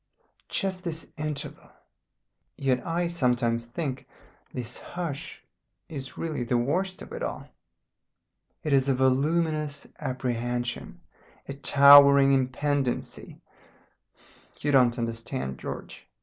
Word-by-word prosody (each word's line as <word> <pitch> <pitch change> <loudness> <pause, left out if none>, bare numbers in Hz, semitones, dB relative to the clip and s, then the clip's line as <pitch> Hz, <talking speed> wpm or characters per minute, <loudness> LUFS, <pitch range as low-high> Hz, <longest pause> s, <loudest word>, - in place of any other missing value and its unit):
Just 190 -2 -1
this 165 -3 -3
interval. 155 -2 -5 0.9
"Yet 130 -2 0
I 170 +1 0
sometimes 120 -7 0
think 130 +1 -4 0.4
this 125 -1 -5
hush 170 -6 -6 0.5
is 135 -4 -7
really 155 -6 -3
the 120 +1 0
worst 180 +10 -1
of - - -13
it 480 +1 -6
all. - - -4 1.2
It 150 -3 0
is 135 0 +3
a 135 - +3
voluminous 150 +3 +1
apprehension, 120 -3 -3 0.5
a 140 - -4
towering 140 0 +7
impendency. 135 0 -1 1.2
You 145 - 0
don't 125 -3 +4
understand, 115 - -3
George. - - -7
140 Hz, 105 wpm, -27 LUFS, 125-155 Hz, 1.2 s, towering